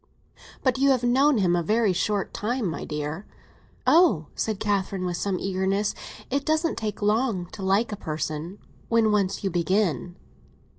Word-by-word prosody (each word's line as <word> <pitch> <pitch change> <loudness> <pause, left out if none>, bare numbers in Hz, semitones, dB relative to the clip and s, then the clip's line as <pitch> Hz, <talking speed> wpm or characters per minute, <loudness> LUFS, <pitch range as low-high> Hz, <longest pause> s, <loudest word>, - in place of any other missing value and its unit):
"But 260 -1 +2
you 275 +1 +4
have 255 -3 +2
known 265 +3 +4
him 180 -4 +2
a 175 - +1
very 215 +2 +2
short 200 +2 -1
time, 240 +2 -2
my 165 -3 -3
dear." 150 +5 -4 0.6
"Oh," 320 - +5
said 215 -3 -2
Catherine, 195 -2 -1
with 175 -1 -2
some 195 -1 -1
eagerness, 195 +2 0 0.4
"it 280 +1 0
doesn't 315 +2 +1
take 215 -1 -4
long 210 -3 +1
to 200 - -9
like 195 +5 +1
a - - -2
person—when 170 +7 -2
once 200 -2 0
you 195 - 0
begin." 175 - 0
200 Hz, 155 wpm, -25 LUFS, 180-230 Hz, 0.6 s, Oh